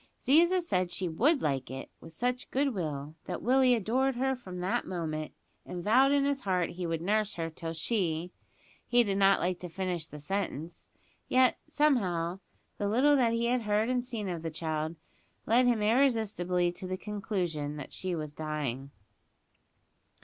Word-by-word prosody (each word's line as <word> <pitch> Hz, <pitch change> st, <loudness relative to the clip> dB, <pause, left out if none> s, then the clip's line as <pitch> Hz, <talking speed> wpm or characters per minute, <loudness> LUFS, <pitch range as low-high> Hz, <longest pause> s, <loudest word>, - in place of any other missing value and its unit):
Ziza 345 Hz, +6 st, +4 dB
said 185 Hz, -, 0 dB
she 180 Hz, +1 st, -2 dB
would 265 Hz, -, +2 dB
like 135 Hz, -3 st, -1 dB
it 130 Hz, +1 st, -7 dB
with -, -, -12 dB
such 250 Hz, +8 st, -2 dB
goodwill, 165 Hz, -, -1 dB
that -, -, -5 dB
Willie 255 Hz, +1 st, +5 dB
adored 250 Hz, +5 st, +1 dB
her 265 Hz, +2 st, +1 dB
from 190 Hz, -8 st, -9 dB
that 180 Hz, +2 st, -1 dB
moment, 155 Hz, -4 st, -3 dB, 0.3 s
and 175 Hz, -1 st, -6 dB
vowed 255 Hz, +7 st, +5 dB
in 285 Hz, -1 st, +3 dB
his 280 Hz, -1 st, 0 dB
heart 180 Hz, -3 st, 0 dB
he 175 Hz, 0 st, -4 dB
would 165 Hz, 0 st, -2 dB
nurse 210 Hz, +2 st, +1 dB
her 165 Hz, -1 st, -3 dB
till 165 Hz, +1 st, -5 dB
she 170 Hz, -2 st, -1 dB, 0.6 s
he 245 Hz, 0 st, +5 dB
did 200 Hz, -2 st, -1 dB
not 195 Hz, 0 st, +5 dB
like 180 Hz, 0 st, -1 dB
to 180 Hz, -, -7 dB
finish 175 Hz, -2 st, -3 dB
the 150 Hz, -, -10 dB
sentence; 170 Hz, -1 st, -4 dB, 0.4 s
yet, 255 Hz, 0 st, +4 dB
somehow, 195 Hz, -, +1 dB, 0.4 s
the 205 Hz, -, 0 dB
little 270 Hz, +7 st, +4 dB
that 240 Hz, -4 st, +3 dB
he 230 Hz, 0 st, 0 dB
had 245 Hz, +1 st, +1 dB
heard 210 Hz, +1 st, +1 dB
and 250 Hz, -1 st, 0 dB
seen 230 Hz, -5 st, -4 dB
of 175 Hz, -3 st, -3 dB
the 165 Hz, -, -3 dB
child 160 Hz, 0 st, -3 dB, 0.5 s
led 245 Hz, +3 st, +4 dB
him 230 Hz, -3 st, +2 dB
irresistibly 210 Hz, -7 st, +2 dB
to 185 Hz, +1 st, -6 dB
the 185 Hz, 0 st, -3 dB
conclusion 180 Hz, -8 st, -3 dB
that 145 Hz, -, -8 dB
she 185 Hz, -2 st, -2 dB
was 155 Hz, -2 st, -5 dB
dying. 145 Hz, -4 st, -3 dB
190 Hz, 170 wpm, -30 LUFS, 165-245 Hz, 0.6 s, Willie